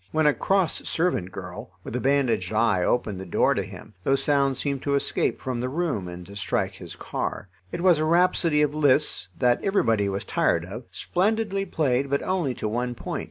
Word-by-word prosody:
When 155 0 +2
a 150 - +5
cross 190 0 0
servant 165 - 0
girl, 90 0 -8
with - - -6
a - - 0
bandaged 125 -8 +1
eye, 110 -4 +2
opened 105 -4 0
the 95 - -6
door - - +3
to - - -1
him, - - -10
those 135 0 +2
sounds 140 -2 +2
seemed 140 -1 -2
to 140 -1 0
escape 140 - 0
from 125 -3 -3
the 125 - -2
room 145 - -2
and 90 0 -8
to 100 +3 -12
strike 100 - -1
his - - -10
car. 100 - -4 0.2
It 170 - -4
was 180 -4 +5
a 155 - +1
rhapsody 165 -2 +3
of 145 -1 0
Liszt's, 145 -8 +2
that 125 -2 +2
everybody 115 - +2
was 100 0 -3
tired 85 0 +1
of, 115 +7 -8
splendidly 195 +1 0
played 140 -5 0
but 140 +1 0
only 175 -9 -1
to 110 - -3
one 120 +3 -2
point. - - -4
135 Hz, 205 wpm, -25 LUFS, 110-155 Hz, 0.2 s, a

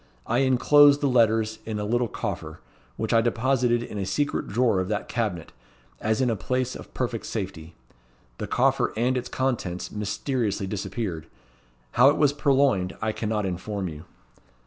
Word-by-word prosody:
I 120 +2 +1
inclosed 140 +2 +5
the 145 - +1
letters 110 -3 +2
in 110 -1 -4
a 105 - -2
little 120 +3 +1
coffer, - - -5 0.4
which 110 +1 -2
I 115 - +5
deposited 120 +1 +1
in 105 - -6
a 95 - -2
secret 145 +9 -1
drawer 115 -3 +2
of 95 - -1
that 105 0 -2
cabinet, 105 -9 -3 0.5
as 110 +3 0
in 125 -2 +2
a - - 0
place 130 +4 -2
of - - -10
perfect 120 -3 -3
safety. 90 -6 -5 0.6
The - - -3
coffer - - +2
and 125 +3 +1
its 125 -1 -3
contents 120 -9 -2
mysteriously 105 0 -2
disappeared. 95 -4 -4 0.6
How 130 +3 +6
it 145 - +1
was 145 -2 +3
purloined 135 -10 +2
I 110 -1 0
cannot 105 -1 -2
inform 95 +1 -3
you." 75 +1 -10
115 Hz, 165 wpm, -25 LUFS, 100-130 Hz, 0.6 s, How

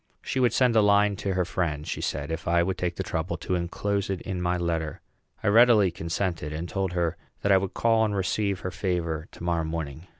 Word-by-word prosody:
She 130 - -2
would 125 -3 +4
send 125 -1 +3
a 110 - +6
line 105 0 +4
to 95 -1 -2
her 90 -1 +1
friend, 75 -5 -2
she - - -3
said, 70 +2 -3
if 80 0 -4
I 85 0 +3
would 95 +1 -2
take 90 -1 -1
the - - -3
trouble 80 +3 -3
to - - -3
enclose 100 +3 -1
it 95 -2 -1
in 90 -2 -3
my 90 0 +1
letter. 80 -3 -2 0.4
I - - 0
readily 110 -3 +6
consented, 85 -1 -3
and 80 +3 -4
told 95 -1 -2
her 85 -2 0 0.3
that 100 - +3
I 95 - +7
would 95 0 -3
call 115 -1 +3
and 105 -2 0
receive 100 0 0
her 95 - -3
favor 85 -4 -2
to - - -11
morrow 85 -1 0
morning. 80 0 -5
90 Hz, 230 wpm, -26 LUFS, 85-100 Hz, 0.4 s, I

